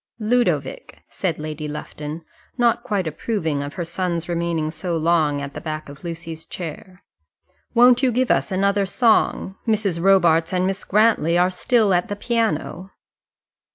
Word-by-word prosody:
"Ludovic," 245 - -1
said 175 -5 -2
Lady 155 0 -5
Lufton 150 +1 -7 0.3
not 240 -2 +2
quite 200 -4 -2
approving 160 -2 -2
of 145 +1 -6
her 175 -3 -3
son's 170 0 -2
remaining 170 -2 -1
so 170 +1 -3
long 155 -3 +1
at 140 0 -7
the - - -7
back 155 -2 -5
of 140 +3 -12
Lucy's 165 -1 -6
chair 180 +2 -8 0.7
"won't 245 +1 +6
you 260 -2 +3
give 250 +2 +1
us 135 +4 +1
another 200 +1 +1
song? 220 -3 +2
Mrs. 205 -6 0
Robarts 170 -3 +4
and 180 0 +1
Miss 195 +1 -2
Grantly 205 -6 +3
are 180 +1 +3
still 210 +2 +2
at 175 0 +1
the 205 - -4
piano." 205 -5 -2
180 Hz, 155 wpm, -22 LUFS, 160-205 Hz, 0.7 s, won't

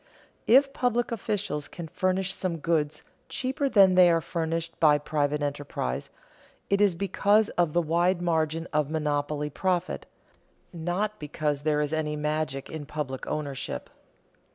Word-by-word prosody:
If 275 +4 +6
public 240 -2 0
officials 205 -9 -2
can 170 -2 -8
furnish 185 +2 0
some 180 -4 -2
goods 155 -2 -1 0.3
cheaper 270 +1 -1
than 195 -6 +6
they 180 -1 +7
are 165 -1 +4
furnished 165 0 -3
by 150 -2 +6
private 150 0 -1
enterprise, 140 - -3 0.6
it 200 0 +3
is 200 -4 +4
because 200 +3 +2
of 170 -4 0
the 175 - +2
wide 170 +3 +2
margin 165 -1 0
of 150 -1 +1
monopoly 150 -1 -1
profit, 180 +6 -1 0.7
not 180 +6 -2
because 150 -1 -2
there 150 0 +1
is 150 +1 -2
any 155 -1 -1
magic 150 -2 -2
in 155 -3 -7
public 145 -4 -4
ownership. 145 -3 -4
160 Hz, 140 wpm, -27 LUFS, 150-185 Hz, 0.7 s, they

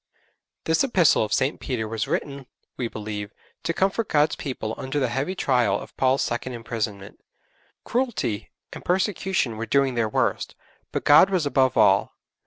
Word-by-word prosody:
This 160 +7 +2
Epistle 185 - +4
of 105 - -4
St. 130 +6 +1
Peter 120 -5 -3
was 110 0 -3
written, 140 -2 -3 0.3
we 125 - -2
believe, 105 -2 -6 0.3
to - - -1
comfort 195 +5 0
God's 150 0 +3
people 120 -6 -4
under 135 +2 -3
the 130 -3 +1
heavy 140 +9 -2
trial 125 -8 +2
of - - -12
Paul's 130 +1 +2
second 120 +2 -3
imprisonment. 110 -4 -5 0.6
Cruelty 240 - -2 0.2
and - - -9
persecution 185 - 0
were 115 +1 -4
doing 140 0 +2
their 115 -2 0
worst, - - -1 0.4
but - - -2
God 150 +6 +7
was 185 -5 0
above 135 -3 +2
all. - - +4
130 Hz, 160 wpm, -24 LUFS, 115-165 Hz, 0.6 s, God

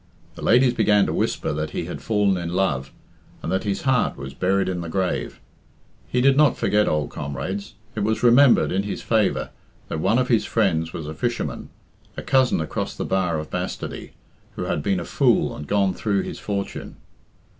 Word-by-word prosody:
The - - -11
ladies 125 +1 +4
began 105 -3 +3
to - - -2
whisper - - -1
that 75 +1 -2
he - - -2
had - - -6
fallen 105 -3 +2
in 85 -1 -3
love, 70 -9 0 0.5
and - - -3
that 95 - 0
his 100 -1 -2
heart 130 -3 +1
was 70 -1 -7
"buried 95 +6 +1
in 90 -2 -2
the 85 - -6
grave." 95 +1 -2 0.7
He 125 - 0
did 135 +1 +5
not 150 -2 +4
forget 105 0 +2
old 75 -1 0
comrades. 85 +8 -5 0.2
It 110 - -4
was 110 +3 0
remembered, 125 +2 +6
in 95 - +1
his 100 0 -5
favour, 110 -3 +1 0.4
that 80 - -3
one 110 - +2
of 130 0 +1
his 115 -4 +3
friends 85 -9 0
was 80 - -6
a 80 - -5
fisherman, 120 +8 -3 0.5
a - - -5
cousin 130 -6 +3
across 80 - -3
the - - -3
bar 90 -4 0
of 75 0 -6
bastardy, - - -5 0.4
who - - -3
had - - -1
been 95 +4 0
a 85 - -5
fool - - +2
and 75 - -8
gone 100 -2 +2
through 100 0 0
his - - -6
fortune. 100 -1 -4
100 Hz, 195 wpm, -23 LUFS, 85-110 Hz, 0.7 s, remembered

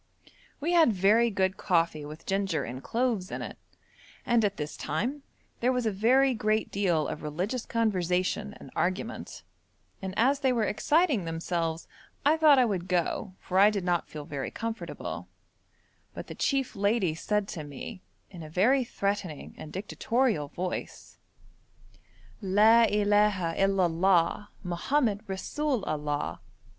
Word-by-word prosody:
We 315 +4 -1
had 330 -8 +5
very 215 +4 +4
good 190 -2 0
coffee 165 -4 +1
with 150 +2 -10
ginger 195 -6 0
and 125 +3 -6
cloves 230 - -1
in - - -4
it, - - -8 0.7
and 235 -2 +3
at 205 -1 0
this 150 0 -4
time 275 +6 -2 0.4
there 245 +2 +2
was 250 -2 -1
a 220 - +2
very 255 +7 +3
great 215 -1 0
deal 180 -6 +1
of - - -5
religious 185 - -3
conversation 200 -1 0
and - - -12
argument, 185 +8 -3 0.6
and 190 0 -5
as 270 +5 +3
they 265 -2 +2
were 235 -3 +1
exciting 290 - +2
themselves 165 0 -2 0.4
I 300 +2 +5
thought 310 -3 +6
I 255 - +5
would 190 -5 -2
go, 180 +2 -1
for 185 +1 0
I 205 +2 +8
did 200 -3 -2
not 175 -1 0
feel 150 -1 -7
very 140 -2 -4
comfortable; 230 0 -5 0.9
but - - -6
the - - -8
chief 270 -2 0
lady 200 -3 +1
said 210 +5 -1
to 160 - -5
me, 145 +7 -8 0.3
in 175 -3 -9
a 155 - -8
very 240 - +3
threatening 200 - -3
and 150 - -9
dictatorial 215 - 0
voice: 180 +5 -6 1.2
'La 215 +4 +5
illaha 205 -4 +2
il 195 0 +2
Allah! 175 +2 +2
Mohammed 205 +5 0
resoul 250 +6 -2
Allah.' 150 -1 -2
200 Hz, 145 wpm, -28 LUFS, 175-230 Hz, 1.2 s, I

